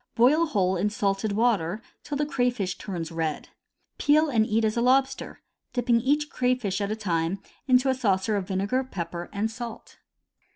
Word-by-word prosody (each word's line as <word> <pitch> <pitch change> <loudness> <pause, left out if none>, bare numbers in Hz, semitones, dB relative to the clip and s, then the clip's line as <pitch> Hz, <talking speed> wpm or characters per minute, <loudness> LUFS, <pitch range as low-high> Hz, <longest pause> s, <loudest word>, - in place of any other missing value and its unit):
Boil 300 +8 +4
whole 190 -9 +1
in 200 +4 +1
salted 200 0 -1
water 210 -4 +1 0.2
till 290 - -4
the 295 - +1
crayfish 245 -9 0
turns 175 -5 -5
red. 160 -2 -3 0.5
Peel 305 +2 +4
and 220 -3 +3
eat 220 +1 +2
as 215 - 0
a 235 - +1
lobster, 265 +2 +1 0.3
dipping 240 -2 +2
each 295 +4 +1
crayfish 250 -6 0
at 200 - -1
a - - 0
time 175 -3 -1 0.3
into 255 0 +4
a 265 - +4
saucer 210 -4 +1
of 195 -2 -2
vinegar, 200 +7 0
pepper, 175 -7 -6
and 215 +2 -1
salt. 230 0 -8
220 Hz, 170 wpm, -26 LUFS, 190-255 Hz, 0.5 s, Boil